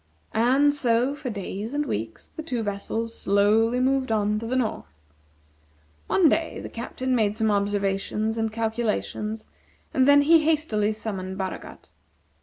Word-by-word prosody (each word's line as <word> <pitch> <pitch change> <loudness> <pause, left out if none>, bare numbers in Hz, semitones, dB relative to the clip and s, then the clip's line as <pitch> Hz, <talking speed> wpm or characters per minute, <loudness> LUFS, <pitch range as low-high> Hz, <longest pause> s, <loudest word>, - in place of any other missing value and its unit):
And 265 +6 +3
so, 250 -1 +1
for 290 -3 -6
days 210 +3 -5
and 295 0 0
weeks, 110 - -5
the - - -8
two 250 -7 -3
vessels 220 +3 -3
slowly 215 +4 +2
moved 260 -1 +1
on 210 -1 +1
to 225 - -6
the 255 - -1
north. 225 - -2 1.2
One 360 - +4
day 320 +2 0
the - - -7
Captain 255 +2 -3
made 215 -2 +1
some 220 -1 +2
observations 200 +2 0
and 225 -1 0
calculations, 220 -1 -2 0.5
and 260 0 +3
then 285 0 +7
he 325 +3 +6
hastily 300 -10 +1
summoned 190 -3 -5
Baragat. 190 -1 -6
225 Hz, 145 wpm, -25 LUFS, 210-260 Hz, 1.2 s, then